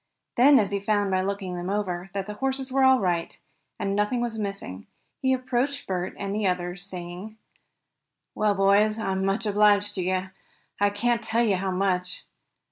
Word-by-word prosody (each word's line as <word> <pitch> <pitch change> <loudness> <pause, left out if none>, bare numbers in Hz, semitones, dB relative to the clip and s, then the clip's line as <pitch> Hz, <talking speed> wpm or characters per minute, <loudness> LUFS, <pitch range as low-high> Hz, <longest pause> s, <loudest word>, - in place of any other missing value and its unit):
Then, 275 +4 +7
as 205 -4 +2
he 200 - 0
found 205 -1 0
by 185 0 +2
looking 195 -1 -3
them 175 +1 -4
over, 190 -3 -2
that 195 -1 -2
the 210 - -6
horses 265 +3 -2
were 270 0 +2
all 260 -1 +6
right, 175 -3 -1 0.4
and 195 - -2
that - - 0
nothing 210 +4 +1
was 235 -2 -2
missing, 195 - -5 0.3
he 260 - +2
approached 260 +2 -1
Bert 180 -1 -3
and 200 0 -3
the 210 -1 0
others, 180 0 -2
saying: 185 +3 -8 1.0
"Well, 210 -1 +1
boys, 200 +2 +3
I'm 190 -3 -1
much 195 +4 0
obliged 205 0 +3
to 190 - -3
you. 185 +1 -1 0.5
I 205 0 +4
can't 235 +3 0
tell 225 +1 +1
you 205 -5 +2
how 190 +1 -2
much. 180 -1 -1
200 Hz, 185 wpm, -26 LUFS, 185-220 Hz, 1.0 s, Then